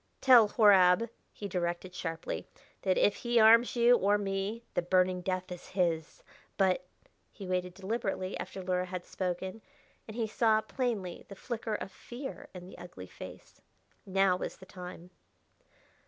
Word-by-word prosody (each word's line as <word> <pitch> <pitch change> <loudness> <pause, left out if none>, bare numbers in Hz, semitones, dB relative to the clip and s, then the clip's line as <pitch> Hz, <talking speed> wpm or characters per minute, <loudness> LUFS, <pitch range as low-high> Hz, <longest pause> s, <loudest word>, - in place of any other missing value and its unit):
"Tell 245 -5 +7
Horab," 205 0 +5 0.2
he 205 - -6
directed 175 0 -3
sharply, 165 -2 -4 0.3
"that 185 -1 +1
if 205 - +2
be 240 0 +1
harms 230 +2 +6
you 240 +1 +6
or 205 -1 +3
me 200 +3 -3
the - - +1
burning 185 +1 +2
death 185 0 -3
is 180 - -8
his! 170 -4 -1 0.3
But 185 -2 +2 0.2
" - - -42
He 200 - -9
waited 180 -1 -2
deliberately 195 -1 -3
after 190 - -6
Luhra 180 0 -1
had 180 -1 -6
spoken, 185 +3 -4 0.5
and 215 - -8
he 230 - +1
saw 220 0 +3
plainly 215 -7 -3
the 200 - -10
flicker 225 0 -4
of 195 - -5
fear 270 +3 -8
in 180 -1 -8
the 185 - -12
ugly 175 - -9
face. - - -12 0.4
Now 195 -1 +2
was - - -5
the 190 - -13
time. 180 -1 -10
190 Hz, 155 wpm, -31 LUFS, 180-220 Hz, 0.5 s, Tell